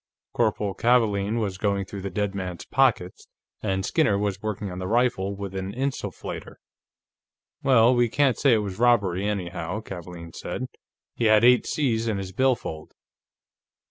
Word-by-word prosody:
Corporal 105 -3 0
Kavaalen 110 -2 +2
was 100 -4 -3
going 100 -2 0
through 100 0 -7
the 100 - -4
dead 100 +1 -2
man's 90 -3 -5
pockets, 115 -9 +1 0.3
and 95 -2 -1
Skinner 110 -10 +2
was 100 -1 -2
working 105 -2 -4
on 90 - -6
the 90 - -4
rifle 110 -3 +1
with 100 -1 -6
an 95 0 -4
insufflator. 135 +1 -4 1.1
"Well, 125 -2 +5
we 120 -1 +2
can't 135 -1 +2
say 140 -4 +4
it 105 - 0
was 95 +1 -6
robbery, 105 -6 +3
anyhow," 90 -2 -3
Kavaalen 85 -4 -9
said. 130 - -5 0.5
"He 120 - -2
had 110 0 +5
eight 125 0 +5
C's 115 -6 0
in 110 -3 0
his 95 -1 -5
billfold." 115 -9 -1
105 Hz, 155 wpm, -25 LUFS, 95-120 Hz, 1.1 s, Well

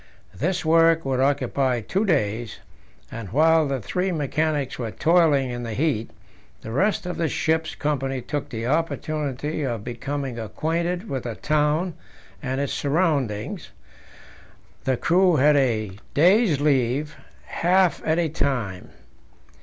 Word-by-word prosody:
This 180 +4 -2
work 165 0 +4
would 130 -1 0
occupy 130 -2 +1
two 190 - -1
days, 115 - 0 0.5
and 115 -4 -7
while 160 - +4
the 135 -1 -1
three 180 - -2
mechanics 150 -3 -1
were 115 -3 -2
toiling 155 -2 +3
in 120 0 -4
the 115 -2 -5
heat, 135 -6 0 0.5
the 110 - -7
rest 190 - +1
of 180 - -4
the 165 -2 0
ship's 160 0 0
company 135 -3 -1
took 145 +4 -4
the 115 0 -4
opportunity 150 0 -2
of 120 -7 -2
becoming 130 +1 -4
acquainted 170 - -2
with 130 -9 -4
the 115 -2 -4
town 150 - 0 0.5
and 130 -2 -2
its 140 -1 -1
surroundings; 140 - -1 1.2
the 130 -2 +1
crew 180 +3 +3
had 150 +1 +4
a 115 -7 +1 0.2
day's 180 - +4
leave, 145 +1 +1 0.3
half 180 +1 +2
at 160 +1 +1
a 170 -1 +2
time. 125 - -2
145 Hz, 135 wpm, -24 LUFS, 125-165 Hz, 1.2 s, work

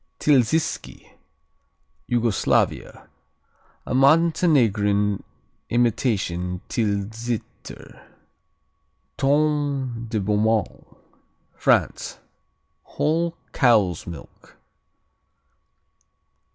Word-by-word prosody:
Tilziski 145 +2 0 1.0
Yugoslavia 115 -3 0 0.8
A - - -4
Montenegrin 125 - +3 0.5
imitation 100 -7 0
Tilsiter. 110 +1 -4 1.1
Tome 140 -4 0
de 110 -1 -1
Beaumont 105 +2 0 0.7
France - - 0 0.6
Whole 165 +2 -1 0.2
cow's 105 - +2
milk. 85 -4 -12
115 Hz, 45 wpm, -23 LUFS, 105-140 Hz, 1.1 s, Montenegrin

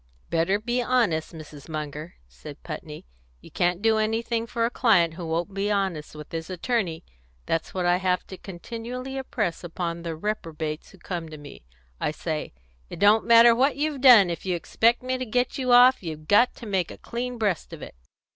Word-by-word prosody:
"Better 170 +4 +2
be 240 +3 -1
honest, 230 -11 +1
Mrs. 155 -2 -11
Munger," 155 +1 -6
said 60 0 -12
Putney. - - -8 0.3
"You - - -16
can't 175 +2 0
do 220 -1 +3
anything 225 +1 -1
for 230 0 -1
a 235 - -1
client 180 -11 +3
who 170 0 -7
won't 170 +4 -2
be 200 +1 -1
honest 190 -8 -2
with 150 0 -10
his 165 +1 -5
attorney. 185 -3 -2 0.4
That's 165 +2 -2
what 180 -1 -1
I 175 0 +3
have 180 -1 0
to 190 - -10
continually 235 +8 -7
impress 215 -11 -3
upon 170 0 -4
the 165 -1 -4
reprobates 160 -5 -4
who 195 - -17
come 170 -2 -6
to 155 - -9
me. 145 - -13 0.3
I - - 0
say, 155 0 -4 0.4
'It - - -8
don't 205 +2 +4
matter 235 0 +8
what 265 +4 +2
you've 290 -1 -2
done; 230 -9 +8
if 170 - -5
you 185 -2 -1
expect 230 +8 +1
me 255 0 -2
to - - -2
get 245 +4 0
you 255 -1 0
off, 250 +2 +7
you've 155 -3 -7
got 225 +7 +4
to 235 - -10
make 190 -5 -1
a - - -9
clean 245 +1 -5
breast 205 -7 -1
of - - -9
it.' - - -9
195 Hz, 195 wpm, -25 LUFS, 165-235 Hz, 0.4 s, matter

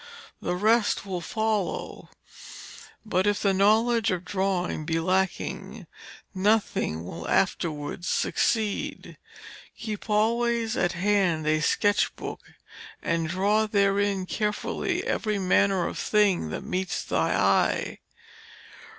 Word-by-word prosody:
The 180 - -1
rest 215 +2 +2
will 185 -3 -4
follow; 220 +1 -2 1.0
but 190 -2 +1
if 205 0 +2
the 200 -1 +2
knowledge 220 +4 +3
of 180 -2 -2
drawing 185 -3 -1
be 160 +1 -1
lacking, 185 +2 -2 0.5
nothing 190 - 0
will 85 -1 -7
afterwards 170 -2 -1
succeed. 215 -3 -1 0.6
Keep 215 -1 -6
always 230 +2 +1
at 175 -1 +1
hand 185 -4 +1
a 155 0 +2
sketch 205 +6 +2
book, - - -7 0.6
and 165 -1 0
draw 205 +5 +2
therein 200 -1 +1
carefully 210 +2 -2
every 215 -2 -1
manner 190 -1 +2
of - - -4
thing 200 - +2
that - - -5
meets 185 0 -2
thy - - 0
eye.' - - +1
195 Hz, 110 wpm, -26 LUFS, 175-210 Hz, 1.0 s, knowledge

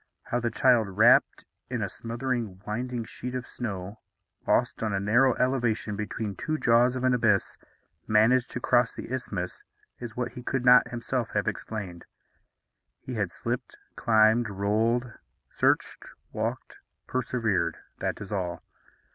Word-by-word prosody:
How 120 - -1
the 120 -1 -1
child, 115 -5 +2
wrapped 115 +3 +5 0.2
in - - -2
a - - -1
smothering 115 -4 -4
winding 120 +2 -3
sheet 125 +3 -6
of 125 -1 -3
snow, 100 -4 -6 0.5
lost - - +1
on 110 -2 -1
a 100 - +1
narrow 120 +6 +3
elevation 120 -5 0
between 105 0 -4
two 155 -1 -2
jaws 120 -1 +4
of 130 - -3
an 130 0 +3
abyss, 115 -5 +1 0.5
managed 115 +4 +4
to - - -4
cross 120 -1 +2
the 125 - -6
isthmus 100 -8 -4 0.4
is 120 -1 -8
what 125 -1 -2
he 125 - -9
could 130 0 -2
not 125 0 +7
himself 120 0 -2
have - - 0
explained. 95 -6 -5 0.9
He - - -7
had - - -1
slipped, - - -4 0.2
climbed, 110 +1 +4
rolled, 110 +5 0 0.3
searched, - - 0 0.2
walked, - - -4 0.3
persevered, 110 -10 -1 0.2
that - - -2
is 100 - -8
all. 90 -4 -3
115 Hz, 145 wpm, -27 LUFS, 105-125 Hz, 0.9 s, not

